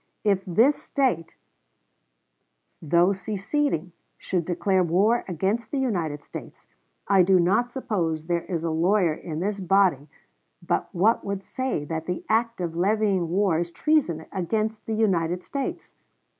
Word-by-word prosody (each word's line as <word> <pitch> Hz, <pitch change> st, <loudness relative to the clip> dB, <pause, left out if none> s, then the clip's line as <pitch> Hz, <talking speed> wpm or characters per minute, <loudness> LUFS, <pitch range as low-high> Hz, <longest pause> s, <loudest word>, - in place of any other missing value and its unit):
If 195 Hz, -2 st, +2 dB
this 230 Hz, -, +3 dB
State, 250 Hz, -, -1 dB, 1.5 s
though 170 Hz, +5 st, +3 dB
seceding, 195 Hz, -, -2 dB, 0.3 s
should 175 Hz, -3 st, -2 dB
declare 185 Hz, +2 st, +1 dB
war 200 Hz, +8 st, +2 dB
against 195 Hz, +6 st, -1 dB
the 285 Hz, -, -2 dB
United 175 Hz, -, -1 dB
States, -, -, -10 dB, 0.4 s
I 195 Hz, -1 st, +5 dB
do 185 Hz, +1 st, +4 dB
not 215 Hz, +8 st, +2 dB
suppose 170 Hz, -, -2 dB
there 170 Hz, 0 st, -1 dB
is 170 Hz, -4 st, -3 dB
a 165 Hz, -, -1 dB
lawyer 175 Hz, +1 st, +2 dB
in 155 Hz, 0 st, -6 dB
this 205 Hz, +2 st, -2 dB
body 185 Hz, -6 st, +2 dB, 0.6 s
but -, -, 0 dB
what 210 Hz, +7 st, +2 dB
would 200 Hz, -1 st, -4 dB
say 260 Hz, -, -3 dB
that 160 Hz, +1 st, -4 dB
the 180 Hz, 0 st, -3 dB
act 230 Hz, -2 st, +1 dB
of 170 Hz, -2 st, -3 dB
levying 195 Hz, -1 st, +1 dB
war 185 Hz, -2 st, +2 dB
is 170 Hz, 0 st, -2 dB
treason 175 Hz, -, +1 dB
against 215 Hz, +4 st, -2 dB
the 220 Hz, -, -1 dB
United 180 Hz, -5 st, +1 dB
States. 275 Hz, -2 st, -5 dB
190 Hz, 145 wpm, -25 LUFS, 170-215 Hz, 1.5 s, I